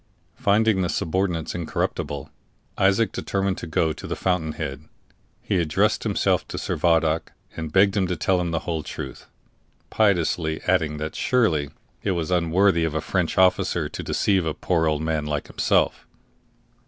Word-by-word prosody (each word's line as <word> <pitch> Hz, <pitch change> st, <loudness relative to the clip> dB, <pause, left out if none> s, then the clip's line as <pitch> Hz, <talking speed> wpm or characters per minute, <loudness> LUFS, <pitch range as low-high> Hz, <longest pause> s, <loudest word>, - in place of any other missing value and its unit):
Finding 105 Hz, -1 st, +3 dB
the 90 Hz, -, 0 dB
subordinates 85 Hz, -1 st, -1 dB
incorruptible, 70 Hz, -4 st, -3 dB, 0.4 s
Isaac 95 Hz, +2 st, +3 dB
determined 95 Hz, -1 st, -2 dB
to -, -, -6 dB
go 80 Hz, 0 st, +1 dB
to -, -, -9 dB
the -, -, -3 dB
fountain 85 Hz, -4 st, -1 dB
head. -, -, -5 dB, 0.6 s
He -, -, 0 dB
addressed 80 Hz, -3 st, +1 dB
himself -, -, +1 dB
to -, -, -6 dB
Servadac, 80 Hz, 0 st, +1 dB, 0.2 s
and 80 Hz, -2 st, -5 dB
begged 95 Hz, +3 st, +4 dB
him 95 Hz, -3 st, +1 dB
to 90 Hz, -, -1 dB
tell 95 Hz, 0 st, +1 dB
him 85 Hz, -, -2 dB
the 80 Hz, -1 st, -1 dB
whole 80 Hz, -2 st, -2 dB
truth, 65 Hz, -2 st, -8 dB, 0.6 s
piteously 85 Hz, -6 st, +1 dB
adding 80 Hz, -5 st, +1 dB
that 75 Hz, +1 st, -5 dB
surely 85 Hz, -, +1 dB, 0.3 s
it 100 Hz, -, 0 dB
was 85 Hz, 0 st, -2 dB
unworthy 90 Hz, +1 st, +3 dB
of 80 Hz, -2 st, -1 dB
a -, -, +1 dB
French -, -, -1 dB
officer 95 Hz, 0 st, +3 dB
to -, -, -6 dB
deceive 95 Hz, -3 st, +1 dB
a 80 Hz, -2 st, -2 dB
poor 80 Hz, -3 st, +1 dB
old 75 Hz, 0 st, 0 dB
man 80 Hz, -2 st, -1 dB
like 75 Hz, -1 st, -2 dB
himself. -, -, 0 dB
85 Hz, 160 wpm, -24 LUFS, 80-95 Hz, 0.6 s, begged